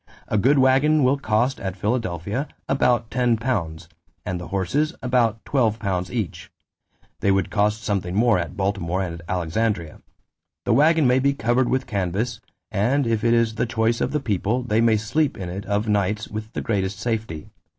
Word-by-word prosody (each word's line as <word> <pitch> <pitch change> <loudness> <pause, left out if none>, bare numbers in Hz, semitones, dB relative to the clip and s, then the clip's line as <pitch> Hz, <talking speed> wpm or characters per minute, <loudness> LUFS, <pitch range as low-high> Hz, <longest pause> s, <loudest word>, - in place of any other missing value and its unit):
A 105 - 0
good 135 +8 +4
waggon 135 +3 +4
will 135 +2 +3
cost, 120 +2 0
at 95 0 -4
Philadelphia, 105 - -2 0.2
about 125 -4 +1
£10... 115 -9 -1 0.4
and 90 -1 -3
the 85 - -7
horses 140 - -1
about 120 -3 +1
£12 105 -8 0
each; 110 -8 -4 0.7
they - - +1
would 95 0 +1
cost 105 +1 +1
something 95 -4 -2
more 115 0 +4
both 85 - -1
at - - -12
Baltimore 95 -2 -1
and 85 -2 -5
Alexandria. 90 0 -1 0.6
The 120 - +2
waggon 155 +4 +4
may 125 +1 +4
be 140 +1 +2
covered 120 +2 +1
with 130 +1 0
canvass, 105 +2 -2 0.3
and 125 +7 +1
if 115 -2 0
it 115 0 +4
is 115 -1 +2
the 110 - -1
choice 115 0 0
of - - 0
the 150 - 0
people, 115 0 -1
they 110 -2 +1
may 115 -2 +4
sleep 125 +8 0
in 90 -2 -5
it 95 +4 -6
of 105 +2 0
nights 105 +1 0
with 110 +1 -6
the - - -3
greatest 95 -3 -1
safety. 110 -9 -3
110 Hz, 175 wpm, -23 LUFS, 100-125 Hz, 0.7 s, good